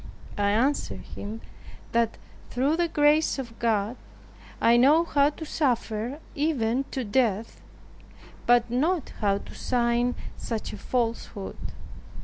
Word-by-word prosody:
I 200 0 +3
answered 255 +8 +1
him, 215 +3 -6 0.5
that 230 -1 +1 0.3
"through 270 +5 +1
the 345 0 +1
grace 300 0 +3
of 235 -4 -7
God, 225 0 +1 0.6
I 235 - +5
know 285 +7 +6
how 285 -4 +3
to 315 +2 -8
suffer, 245 -4 -1 0.2
even 275 -4 0
to 260 - -3
death, 220 -1 0 0.9
but 240 -1 +4
not 310 +6 +1
how 200 -2 +3
to - - -10
sign 240 0 +1 0.2
such 225 -2 -4
a - - -6
falsehood." 230 -4 -2
245 Hz, 125 wpm, -27 LUFS, 225-285 Hz, 0.9 s, know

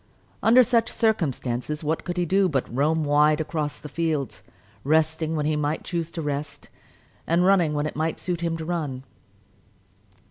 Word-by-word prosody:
Under 245 +3 +6
such 235 -2 +2
circumstances 150 - -1
what 155 +2 -1
could 175 0 -4
he 175 - +1
do 190 +2 +2
but 135 -5 -1
roam 155 +4 +2
wide 150 +1 +3
about 160 - -3
across 150 -6 -3
the 150 - -9
fields, 150 -4 -2 0.4
resting 160 +2 +1
when 150 -1 -1
he 155 0 +1
might 150 +1 -1
choose 170 -2 -3
to 165 - -4
rest, 145 0 -5 0.6
and 170 +2 +3
running 180 -6 +3
when 145 0 0
it 155 - -4
might 160 +1 -1
suit 175 -2 -3
him 165 -1 -1
to 160 - -6
run. 150 -7 -3
155 Hz, 175 wpm, -24 LUFS, 150-170 Hz, 0.6 s, Under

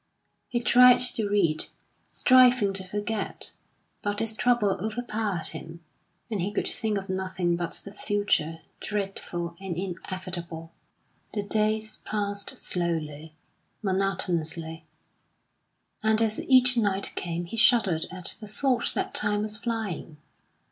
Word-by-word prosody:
He 240 - 0
tried 250 +1 +7
to 240 -4 +6
read, 170 -7 +2 0.4
striving 250 -5 +5
to 195 -1 -3
forget; 205 +2 -2 0.5
but 205 0 -2
his 225 0 -2
trouble 240 -4 +2
overpowered 215 -5 -1
him, 165 +1 -8 0.5
and 205 -4 -1
he 195 +4 -1
could 210 - 0
think 220 -3 0
of 195 0 -5
nothing 185 -2 -1
but 170 -1 -4
the 200 - -7
future, 205 -6 0 0.2
dreadful 190 -4 -4
and 185 -4 -4
inevitable. 175 -3 -5 0.6
The 205 - -1
days 215 +1 0
passed 205 -1 -3
slowly, 160 -3 -3 0.5
monotonously; 170 -5 -2 1.1
and 220 0 +3
as 220 -1 0
each 255 -1 +6
night 200 -3 0
came 175 0 -3
he 170 - -7
shuddered 220 - +4
at 185 -1 -3
the 215 - -8
thought 245 +3 +1
that - - -2
time 205 0 +1
was 215 0 -3
flying. 215 -9 -4
200 Hz, 125 wpm, -27 LUFS, 175-220 Hz, 1.1 s, tried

